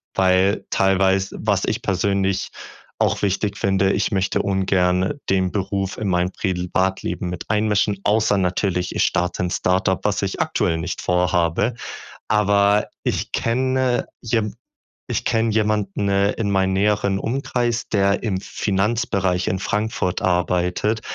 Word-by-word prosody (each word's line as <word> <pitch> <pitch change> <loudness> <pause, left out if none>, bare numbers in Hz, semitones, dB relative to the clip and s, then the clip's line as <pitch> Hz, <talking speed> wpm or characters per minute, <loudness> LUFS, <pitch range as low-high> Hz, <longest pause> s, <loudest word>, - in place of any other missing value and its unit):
weil 95 +2 +2
teilweise 95 0 +2
was - - +1
ich - - -2
persönlich 95 0 0 0.5
auch - - +1
wichtig 100 +1 -1
finde, 95 0 +2
ich 100 - 0
möchte 95 -1 0
ungerne 95 +2 +1
den 95 -1 +1
Beruf 95 -1 -2
in 105 - -3
mein 90 0 +1
Privatleben 90 0 -1
mit 90 -1 -5
einmischen, 105 -2 +1
außer 105 -1 +3
natürlich, 90 0 -1
ich - - +2
starte 90 +1 0
'n 90 - -2
Start-up, 95 +1 +1
was 100 -2 +1
ich 95 - -3
aktuell 80 - 0
nicht 90 +2 -4
vorhabe. 90 +4 +1 0.5
Aber 100 0 +3 0.2
ich - - -2
kenne 130 +1 0 0.2
je 110 -2 0 0.6
ich - - -2
kenne 115 0 +1
jemanden, 105 -2 0
äh, 100 +1 +2
in 105 -3 -2
meinem 95 -1 +2
näheren 100 0 +1
Umkreis, 120 -1 -1
der 100 0 +1
im 95 -4 -1
Finanzbereich 100 -3 -1
in 95 - -1
Frankfurt 105 -3 -1
arbeitet, 90 +4 0
95 Hz, 135 wpm, -21 LUFS, 95-105 Hz, 0.6 s, außer